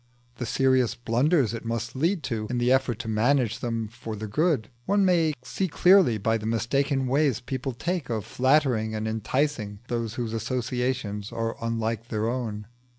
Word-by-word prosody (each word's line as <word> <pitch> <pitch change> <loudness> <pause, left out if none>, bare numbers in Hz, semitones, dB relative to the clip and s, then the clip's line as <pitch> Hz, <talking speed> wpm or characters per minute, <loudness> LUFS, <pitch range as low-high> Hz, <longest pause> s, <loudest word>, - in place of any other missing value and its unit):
The 125 - -4
serious 130 -2 +2
blunders 120 - +2
it 115 - -5
must 115 +1 -3
lead 165 +6 +1
to 110 -4 -3
in 125 - -1
the 120 +1 +2
effort 130 -4 +2
to 120 - -8
manage 115 +1 +2
them 115 -3 -2
for 115 0 -7
their 110 +1 -5
good, 145 - +1 0.2
one 200 0 +3
may 165 -4 +3
see 190 +9 -2
clearly 180 - +5
by 110 +2 +1
the 110 - -5
mistaken 135 +5 +1
ways 135 -2 +2
people 130 +1 -4
take 165 +3 -3
of 110 -4 -2
flattering 130 -5 +2
and 110 0 -2
enticing 110 0 -1
those 115 -1 -2
whose 120 -3 -3
associations 125 -3 -2
are 115 -1 -2
unlike 115 0 -2
their 110 -1 -1
own. 115 -4 -3
120 Hz, 170 wpm, -26 LUFS, 110-135 Hz, 0.2 s, clearly